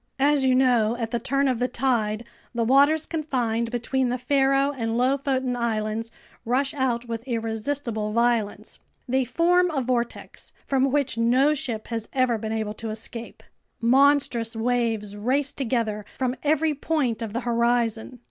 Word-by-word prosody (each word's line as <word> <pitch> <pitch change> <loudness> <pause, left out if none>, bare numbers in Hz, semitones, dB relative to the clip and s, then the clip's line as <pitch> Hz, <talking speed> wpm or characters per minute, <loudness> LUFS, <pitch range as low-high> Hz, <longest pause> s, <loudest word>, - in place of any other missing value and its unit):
As 280 0 +3
you 260 -1 +3
know, 240 -3 +3
at 230 -2 -3
the 235 - 0
turn 275 +4 0
of 255 -3 0
the 250 - +1
tide, 235 -4 0 0.3
the 235 - +1
waters 285 +6 +4
confined 245 -8 -1
between 245 +2 -1
the 250 - -1
Faroe 275 +2 +2
and 230 -4 -2
Lofoten 260 0 0
Islands 225 -1 -2 0.3
rush 265 +4 0
out 245 -4 -1
with 230 -1 -4
irresistible 225 -1 -2
violence. 235 -2 0 0.3
They 260 +1 +2
form 350 +7 +3
a 305 -5 -1
vortex 245 -2 -3
from 270 -1 +2
which 270 -4 0
no 255 +6 +4
ship 240 -7 -4
has 225 -2 -4
ever 255 -4 +1
been 220 0 -4
able 220 -1 -2
to 225 - -4
escape. 225 +2 -7 0.4
Monstrous 250 -2 +3
waves 225 -3 -1
race 265 +7 0
together 230 -6 -1
from 255 -1 -1
every 310 +1 +2
point 280 -6 -1
of 220 -3 -4
the 240 - -2
horizon. 235 0 0
245 Hz, 155 wpm, -24 LUFS, 230-270 Hz, 0.4 s, waters